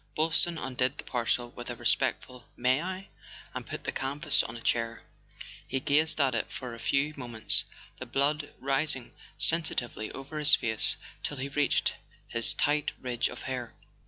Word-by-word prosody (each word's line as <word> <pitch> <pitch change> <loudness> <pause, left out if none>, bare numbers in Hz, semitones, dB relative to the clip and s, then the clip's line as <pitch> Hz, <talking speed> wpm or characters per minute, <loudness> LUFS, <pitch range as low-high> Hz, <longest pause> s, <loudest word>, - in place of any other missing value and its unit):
Boylston 165 +2 +3
undid 130 -1 -1
the - - -6
parcel, 120 0 -1
with 120 0 -8
a - - -3
respectful: 125 -1 0
"May 130 +3 +3
I?" 185 +2 -5 0.4
and - - -6
put - - -6
the - - -2
canvas 135 +2 +1
on 115 - -5
a - - -8
chair. 115 0 -1 0.6
He 135 - -1
gazed 155 +4 +2
at 135 -3 +3
it 115 - -1
for 125 -3 -6
a 115 - -9
few 145 +5 +1
moments, 120 -4 +2 0.3
the 130 - -6
blood 145 +4 +1
rising 135 -1 -1 0.2
sensitively 125 -9 +1
over 140 +3 -6
his 150 0 +6
face 110 -1 +2 0.2
till 145 - -4
it 140 +2 -5
reached 145 -1 +2 0.3
his 115 -1 +4
tight 150 0 +1
ridge 125 -2 -1
of - - -9
hair. 125 -3 -4
135 Hz, 165 wpm, -29 LUFS, 120-150 Hz, 0.6 s, his